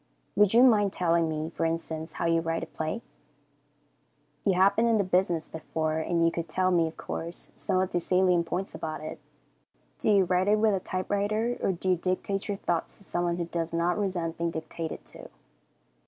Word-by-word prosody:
Would 210 +1 +4
you 240 - +8
mind 210 -6 +5
telling 170 -2 +2
me, 155 +1 -3
for 165 - -3
instance, 165 -1 -3
how - - -3
you 165 0 +3
write 165 0 -2
a - - -2
play? 160 +9 -4 1.4
You 195 - +3
have 190 +2 +4
been 230 +1 +3
in 230 -1 +4
the 205 - +2
business 180 -3 +1
before, 160 0 -2
and 170 +1 +1
you 165 - +3
could 165 -1 -4
tell 185 +3 +1
me, 170 -2 +3
of 160 - -9
course, 170 +1 -6
some 185 - 0
of 185 0 0
the 175 - +1
salient 180 -1 +2
points 185 +3 -3
about 155 -1 -5
it. 155 - -6 0.8
Do - - 0
you 200 -2 +6
write 180 +1 +1
it 210 +1 +4
with 215 -1 +3
a 195 - +1
typewriter, 205 +6 -1
or - - +2
do 185 +1 -1
you - - +4
dictate 185 +3 -2
your 205 -2 -2
thoughts 170 -4 -2
to - - -12
someone 175 -2 -1
who 170 - -1
does 165 -1 -3
not 170 +1 +1
resent 180 -6 -2
being 170 0 +1
dictated 160 0 -5
to? - - -11
175 Hz, 205 wpm, -28 LUFS, 165-195 Hz, 1.4 s, you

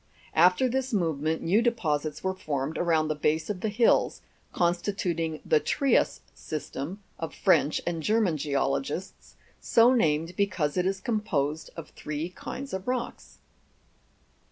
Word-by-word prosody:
After 180 +9 +5
this 265 +1 -2
movement, 160 -3 0
new 195 +7 +3
deposits 155 -11 -1
were 190 0 0
formed 150 -4 -3
around 160 -3 +2
the 155 - 0
base 155 +5 0
of 185 -3 -6
the 220 - 0
hills, 225 +3 +2 0.3
constituting 175 -2 -1
the 465 - +4
Trias 280 -9 +1
System 155 +5 -6 0.2
of 165 - -5
French 150 - +3
and 170 -2 -2
German 210 -2 +2
geologists, 145 +4 -2 0.2
so 235 +2 +5
named 165 -6 +1
because 185 -7 0
it 180 0 +1
is 195 0 -2
composed 160 - -1
of 165 - -8
three 155 +3 -4
kinds 265 +8 -7
of 190 +3 -4
rocks. 250 -1 -4
175 Hz, 135 wpm, -27 LUFS, 155-210 Hz, 0.3 s, After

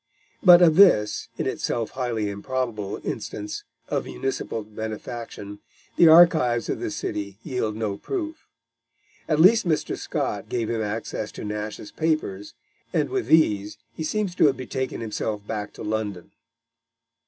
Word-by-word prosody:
But 180 -2 +8
of 160 -2 +5
this, 175 - +5
in - - -2
itself 115 -2 -2
highly 120 -5 -2
improbable, 105 0 -3
instance 105 0 -5 0.2
of - - -1
municipal 135 -4 -3
benefaction, 110 -1 -7 0.4
the 170 - +7
archives 160 -8 +6
of - - -1
the - - -3
city 100 -1 -4
yield 125 -7 -2
no 105 -3 -2
proof. 320 - -5 0.8
At 155 -1 +2
least 200 +4 +6
Mr. 155 -2 0
Scott - - -3
gave 115 -2 -1
him 115 -1 -1
access 110 0 -3
to - - -7
Nash's 105 0 -5
papers, 155 -12 -2 0.4
and - - +1
with 390 -1 -1
these 105 -10 +3 0.2
he 160 - -5
seems 200 +3 -1
to - - +6
have 135 - +1
betaken 130 -1 -4
himself 105 -1 -3
back 105 -1 -4
to - - -9
London. 105 -4 -3
115 Hz, 140 wpm, -24 LUFS, 105-155 Hz, 0.8 s, But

